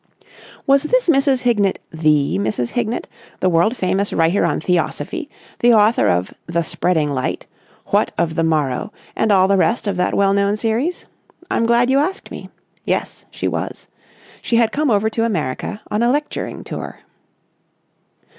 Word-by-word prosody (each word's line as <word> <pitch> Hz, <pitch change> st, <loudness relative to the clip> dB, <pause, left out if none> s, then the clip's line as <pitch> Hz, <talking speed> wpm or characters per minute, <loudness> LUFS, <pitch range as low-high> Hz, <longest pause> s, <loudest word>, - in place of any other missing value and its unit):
Was 275 Hz, 0 st, +4 dB
this -, -, +1 dB
Mrs. 275 Hz, -4 st, +3 dB
Hignett 210 Hz, -6 st, +2 dB
the 150 Hz, -, +1 dB
Mrs. 110 Hz, +4 st, -1 dB
Hignett, 235 Hz, 0 st, -2 dB, 0.3 s
the 185 Hz, -, +2 dB
world 175 Hz, +8 st, +2 dB
famous 195 Hz, +1 st, 0 dB
writer 165 Hz, +4 st, +2 dB
on -, -, +1 dB
Theosophy, 235 Hz, -, -2 dB, 0.3 s
the 240 Hz, -1 st, +5 dB
author 215 Hz, +2 st, +4 dB
of 90 Hz, +1 st, 0 dB
"The 170 Hz, 0 st, 0 dB
Spreading 160 Hz, -4 st, 0 dB
Light," 130 Hz, -2 st, -2 dB, 0.5 s
"What -, -, +3 dB
of 165 Hz, -1 st, 0 dB
the 165 Hz, -, 0 dB
Morrow," 150 Hz, 0 st, 0 dB, 0.2 s
and 220 Hz, -, +1 dB
all 190 Hz, -1 st, +5 dB
the 200 Hz, 0 st, +3 dB
rest 225 Hz, +5 st, +1 dB
of 200 Hz, -3 st, -2 dB
that 180 Hz, -, 0 dB
well 195 Hz, 0 st, +3 dB
known 200 Hz, +1 st, +1 dB
series? 235 Hz, +11 st, -1 dB, 0.5 s
I'm 230 Hz, -, +1 dB
glad 240 Hz, +2 st, +3 dB
you 270 Hz, -, +4 dB
asked 370 Hz, +7 st, -2 dB
me. -, -, -8 dB, 0.3 s
Yes, -, -, -3 dB
she -, -, -4 dB
was. -, -, -4 dB, 0.5 s
She 235 Hz, -, -1 dB
had 230 Hz, -1 st, +3 dB
come 295 Hz, +2 st, 0 dB
over 215 Hz, -1 st, +2 dB
to 225 Hz, -, -1 dB
America 190 Hz, -, -2 dB
on 210 Hz, -, 0 dB
a 235 Hz, -, +3 dB
lecturing 295 Hz, +3 st, -2 dB
tour. -, -, -7 dB
205 Hz, 165 wpm, -19 LUFS, 165-240 Hz, 0.5 s, the